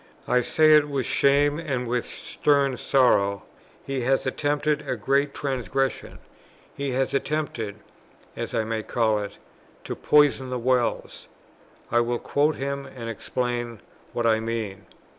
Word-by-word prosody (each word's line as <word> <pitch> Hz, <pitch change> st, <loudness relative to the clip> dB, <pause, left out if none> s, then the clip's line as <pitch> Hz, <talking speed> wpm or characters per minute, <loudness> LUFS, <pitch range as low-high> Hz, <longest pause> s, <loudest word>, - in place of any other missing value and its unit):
I 125 Hz, -, +3 dB
say 155 Hz, +5 st, +4 dB
it 150 Hz, -1 st, +6 dB
with 135 Hz, -3 st, -1 dB
shame 145 Hz, +2 st, +3 dB
and 135 Hz, -7 st, -2 dB
with 120 Hz, 0 st, -1 dB
stern 140 Hz, -2 st, +1 dB
sorrow; 100 Hz, -8 st, +2 dB, 0.4 s
he 135 Hz, -1 st, -2 dB
has 130 Hz, +2 st, +1 dB
attempted 145 Hz, +2 st, 0 dB
a -, -, 0 dB
great 140 Hz, +5 st, +1 dB
transgression; 135 Hz, -1 st, -2 dB, 0.6 s
he 140 Hz, -2 st, -3 dB
has 130 Hz, +1 st, 0 dB
attempted 140 Hz, -7 st, -2 dB, 0.6 s
(as -, -, -4 dB
I 110 Hz, -, +1 dB
may 110 Hz, 0 st, -2 dB
call 110 Hz, -1 st, +1 dB
it) 100 Hz, -1 st, -6 dB, 0.5 s
to -, -, -5 dB
poison 145 Hz, -3 st, +3 dB
the 125 Hz, -, -2 dB
wells. 125 Hz, 0 st, -1 dB, 0.6 s
I 120 Hz, -, +4 dB
will 120 Hz, 0 st, 0 dB
quote 145 Hz, +5 st, +1 dB
him 140 Hz, 0 st, -4 dB
and 115 Hz, -3 st, -6 dB
explain 120 Hz, 0 st, -3 dB, 0.3 s
what 120 Hz, -, -2 dB
I 110 Hz, -1 st, +4 dB
mean.... 110 Hz, -3 st, -4 dB
130 Hz, 140 wpm, -25 LUFS, 115-140 Hz, 0.6 s, it